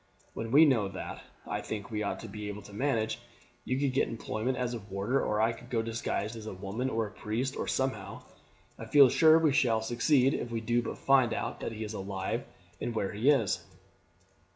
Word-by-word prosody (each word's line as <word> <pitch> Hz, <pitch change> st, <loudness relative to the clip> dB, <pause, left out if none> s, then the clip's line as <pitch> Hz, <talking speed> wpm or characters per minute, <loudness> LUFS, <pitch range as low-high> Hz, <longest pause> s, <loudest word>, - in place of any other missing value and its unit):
When 115 Hz, -, -4 dB
we 150 Hz, +5 st, +8 dB
know 120 Hz, -9 st, +3 dB
that, 95 Hz, -1 st, -7 dB, 0.2 s
I -, -, -3 dB
think 105 Hz, -1 st, -6 dB
we 105 Hz, -1 st, -2 dB
ought 100 Hz, -, -2 dB
to -, -, -7 dB
be 105 Hz, -1 st, -6 dB
able 105 Hz, 0 st, -6 dB
to 100 Hz, -, -13 dB
manage. 110 Hz, -2 st, 0 dB, 0.5 s
You 130 Hz, -, 0 dB
could 140 Hz, -2 st, +1 dB
get 135 Hz, -, +2 dB
employment 115 Hz, +3 st, -3 dB
as 125 Hz, -1 st, -1 dB
a 120 Hz, -, -3 dB
warder, 100 Hz, +6 st, -1 dB
or 105 Hz, -, 0 dB
I 110 Hz, +1 st, +3 dB
could 115 Hz, +1 st, -11 dB
go 115 Hz, -3 st, 0 dB
disguised 115 Hz, -1 st, -2 dB
as 110 Hz, -1 st, -8 dB
a -, -, -5 dB
woman, 100 Hz, +7 st, -3 dB
or 115 Hz, -2 st, 0 dB
as 105 Hz, -, -8 dB
a -, -, -20 dB
priest, 120 Hz, +5 st, -2 dB
or -, -, -3 dB
somehow. 130 Hz, -7 st, -2 dB, 0.6 s
I -, -, -6 dB
feel 140 Hz, -3 st, +7 dB
sure 160 Hz, +4 st, +6 dB
we 160 Hz, -3 st, +3 dB
shall 115 Hz, -6 st, +2 dB
succeed 125 Hz, +3 st, +3 dB
if -, -, -3 dB
we 115 Hz, -1 st, -2 dB
do 120 Hz, +2 st, +1 dB
but 115 Hz, -, -5 dB
find 130 Hz, -4 st, +3 dB
out -, -, -3 dB
that -, -, -4 dB
he 110 Hz, 0 st, -5 dB
is 105 Hz, 0 st, -5 dB
alive 95 Hz, -1 st, -3 dB, 0.4 s
and 120 Hz, -, -3 dB
where 100 Hz, -3 st, -1 dB
he 110 Hz, +7 st, +2 dB
is." 125 Hz, -9 st, +2 dB
115 Hz, 225 wpm, -30 LUFS, 105-130 Hz, 0.6 s, we